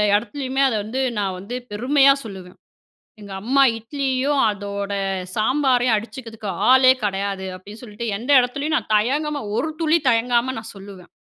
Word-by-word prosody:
இடத்துலயுமே, 260 +5 -2
அத 235 - -1
வந்து 230 +6 -4 0.2
நான் 195 -2 -1
வந்து 210 +6 -7 0.2
பெருமையா 270 +5 +4
சொல்லுவேன். 190 -4 -10 0.6
"எங்க 200 -1 -11
அம்மா 265 +5 +2 0.2
இட்லியும், 270 +3 -1
அதோட 200 0 -4 0.4
சாம்பாரையும் 250 +1 +2
அடிச்சுக்கிறதுக்கு 225 -2 -6 0.2
ஆளே 260 0 +7
கிடையாது" 195 -1 -2
அப்பிடின்னு 205 +5 -12
சொல்ட்டு, 230 0 -7
எந்த 250 +6 -3
இடத்துலேயும் 280 +5 -1
நான் 220 - -5
தயங்காம, 285 +7 0 0.2
ஒரு 285 +7 -1
துளி 320 +1 +3
தயங்காம 240 +2 +1
நான் 220 - -9
சொல்லுவேன். 195 -2 -12
235 Hz, 140 wpm, -21 LUFS, 205-265 Hz, 0.6 s, ஆளே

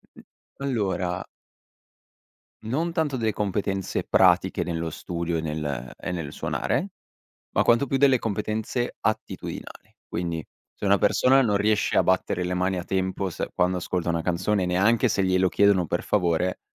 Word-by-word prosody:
Mhmm, - - -14 0.4
allora 95 -9 -1 1.4
non 150 +10 -1
tanto 160 -5 0
delle 110 -3 0
competenze 100 -1 -2
pratiche - - +3
nello 85 -1 -2
studio 85 +1 -3
e - - -2
nel 75 -5 -4
e - - -5
nel 85 -5 -4
suonare, - - -1 0.6
ma - - +2
quanto 120 +4 +4
più 135 - +1
delle 135 -2 +4
competenze 110 +3 -2
attitudinali. 110 0 -4
Quindi 85 -2 -3 0.3
se - - -6
una 100 0 +5
persona 130 +7 +4
non 105 -5 +2
riesce 105 +1 +1
a - - +5
battere 90 0 +1
le 90 - -2
mani 90 +1 0
a 90 - -4
tempo 95 0 -1
se - - -4
quando 90 0 +1
ascolta 90 0 -3
una 85 -1 +1
canzone, 90 +3 0
neanche 100 +6 +3
se 95 - +1
glielo 95 0 +3
chiedono 100 -4 +3
per - - -1
favore, 90 -2 +1
95 Hz, 155 wpm, -25 LUFS, 90-110 Hz, 1.4 s, una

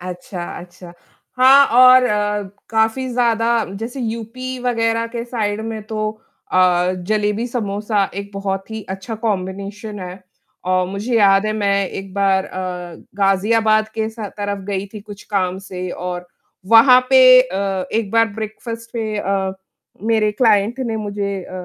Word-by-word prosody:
अच्छा, 180 0 -7 0.2
अच्छा। 175 0 -13 0.5
हाँ, 270 +2 +7
और 255 +1 +7
अ, 210 -2 0 0.3
काफ़ी 225 +4 +1
ज़्यादा 235 -2 +1 0.2
जैसे 245 +4 -5
यूपी 235 +3 -5
वगैरह 230 -1 0
के 235 0 -5
साइड 220 -3 -2
में 220 -1 -5
तो 215 -1 -2 0.4
अ, 180 0 +3
जलेबी 210 +2 0
समोसा 210 -3 -1
एक 200 +1 -6
बहुत 195 +1 -4
ही 220 -1 -5
अच्छा 190 +3 -5
कॉम्बिनेशन 200 +1 -4
है। 185 +1 -8 0.4
और 185 0 +2
मुझे 210 +5 -2
याद 195 -1 +4
है 215 - 0
मैं 200 -2 0
एक 195 -1 -8
बार 195 -1 +2
अ, 180 -2 -6 0.3
गाज़ियाबाद 215 +2 +2
के 220 -1 -1
स 220 - -20 0.2
तरफ 205 0 -2
गई 195 -1 -2
थी 210 - -7
कुछ 205 0 -11
काम 185 -2 0
से 185 -1 -6
और 180 0 -5 0.4
वहाँ 250 +3 +8
पे 260 -1 +7 0.2
अ, 195 -5 -2
एक 220 -2 -1
बार 230 +1 +4
ब्रेकफास्ट 225 +2 -7
पे 220 -2 -3
अ, 195 -1 -1 0.5
मेरे 220 -1 +2
क्लाइंट 215 +1 +2
ने 225 -1 -2
मुझे 205 -2 -3
अ, - - -13
210 Hz, 150 wpm, -19 LUFS, 195-230 Hz, 0.5 s, वहाँ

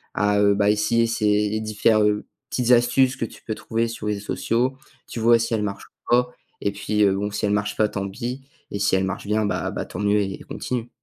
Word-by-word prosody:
à, 105 0 +2
heu, 100 0 +4
bah, 100 0 +2
essayer 115 +2 +2
ces 105 -1 +1
différ 110 0 +2 0.5
petites 125 -1 0
astuces 125 +2 +4
que 115 - -1
tu - - -13
peux 110 - -3
trouver 115 +1 -1
sur 110 -2 -6
les 105 - +1
réseaux 100 0 -7
sociaux, 125 +4 0 0.3
tu 115 - -6
vois 115 +1 +5
si 115 0 -1
elles 105 - 0
marchent 100 -1 -5
ou 120 - -1
pas 125 0 +1 0.3
et 100 - 0
puis 105 +1 +1
bon, 100 +2 -1
si 105 - -2
elles 100 - +1
marchent 105 0 0
pas 105 -1 +2
tant 100 -1 -3
pis 125 +5 -5 0.3
et 100 - -3
si 95 - +2
elles 95 - +1
marchent 95 +2 -3
bien, 105 0 +1
bah - - -1
bah - - -3
tant 90 - -8
mieux 105 0 +2
et 95 -1 -4
continue. 120 -2 -4
105 Hz, 235 wpm, -23 LUFS, 105-115 Hz, 0.5 s, vois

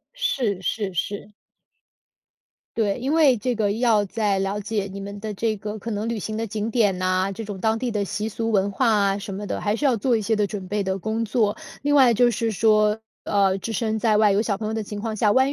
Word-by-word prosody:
是 235 - -1
是 200 0 -2
是。 200 +4 -3 1.5
对， 210 -1 +1
因 270 +4 -1
为 290 -7 +5
这 245 +3 -1
个 210 -2 +1
要 220 -1 +3
在 205 -1 0
了 195 +2 -1
解 205 -1 -2
你 200 - -7
们 200 +1 -7
的 215 -1 -4
这 220 +2 -1
个 210 +1 -6
可 230 +3 -5
能 210 +2 -2
旅 230 -2 -2
行 215 +2 -4
的 225 +1 -2
景 215 0 -3
点 215 -5 +2
呐， 185 +1 0
这 225 +3 -6
种 205 -1 -6
当 220 0 +1
地 250 - -1
的 210 -3 -1
习 210 +2 -3
俗 225 +1 -2
文 200 -1 +2
化 235 +5 +1
啊， 200 -2 +2
什 200 0 -6
么 205 +2 -5
的， - - -3
还 205 0 0
是 295 - -2
要 260 -3 +4
做 235 +2 +1
一 - - -2
些 220 +2 +1
的 210 -1 +2
准 200 -2 -6
备 205 +2 -1
的 190 0 -2
工 220 +3 -2
作。 215 -1 +1 0.3
另 290 0 +2
外 260 -4 +6
就 240 +2 +4
是 230 -1 -1
说， 215 0 +3 0.2
呃， 195 -1 +2
置 225 - -5
身 220 0 -1
在 220 -1 +2
外 210 -2 +4
有 200 - +2
小 210 -3 -1
朋 215 0 -4
友 220 - -2
的 220 - -2
情 205 0 -6
况 220 0 -3
下， 210 -1 +3
万 265 +4 +4
215 Hz, 265 characters per minute, -23 LUFS, 200-225 Hz, 1.5 s, 外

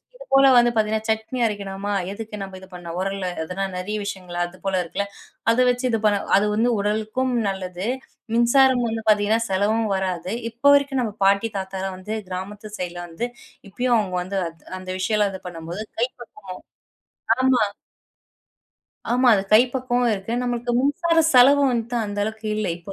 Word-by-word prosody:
இது - - -12
போல 270 0 +7
வந்து 240 0 +5
பார்த்தீங்கன்னா, 220 0 0
சட்னி 220 +4 -1
அரைக்கணுமா 200 -1 -3 0.2
எதுக்கு 210 0 -7
நம்ப 190 -1 -7
இது 190 - -13
பண்ணணும்? 175 -1 -7
உரல்ல 195 0 -2 0.2
அதெல்லாம் 190 +3 -4
நெறைய 195 +4 -3
விஷயங்கள், 185 -3 -6
அது 175 +1 -12
போல 190 -1 +1
இருக்குல்ல. 200 +4 -3 0.4
அத 230 - +1
வச்சு 245 +1 0
இது 225 - +1
பண்ண 205 -1 +3 0.2
அது 200 - +2
வந்து 230 +3 +2
உடலுக்கும் 220 +5 -1 0.2
நல்லது, 185 0 -4 0.5
மின்சாரம் 245 +1 +4
வந்து 225 0 -3
பார்த்தீங்கன்னா, 210 +2 +3
செலவும் 210 +4 +1
வராது. 185 0 -2 0.2
இப்ப 235 +4 -40
வரைக்கும் 280 -2 +1
நம்ம 215 -3 -3
பாட்டி, 200 +3 +3
தாத்தாலாம் 190 0 -4
வந்து 210 +4 -5
கிராமத்து 205 +3 -6
சைடுல 175 -1 -5
வந்து 175 +9 -4 0.4
இப்பயும் 245 +4 +1
அவங்க 185 -3 -2
வந்து 195 +2 -4
அந் 165 0 -11 0.2
அந்த 185 0 -10
விஷயம்லாம் 210 +1 +1
இது 190 - -7
பண்ணும்போது 170 +4 -6 0.2
கை 240 - +3
பக்குவம் 200 -5 -10 0.8
ஆமா. 260 -3 +4 1.5
ஆமா. 250 +1 +4
அது 195 - +1
கை 215 - +9
பக்குவமும் 245 -2 +1
இருக்கு, 195 +3 -5
நம்மளுக்கு 245 0 -2
மின்சார 330 +4 +1 0.2
செலவும் 275 +2 +6
வந்துட்டு 235 0 -2
அந்த 205 0 -5
அளவுக்கு 220 +1 -5
இல்ல. 215 - -1
இப்போ 175 +3 -9
210 Hz, 165 wpm, -23 LUFS, 190-240 Hz, 1.5 s, கை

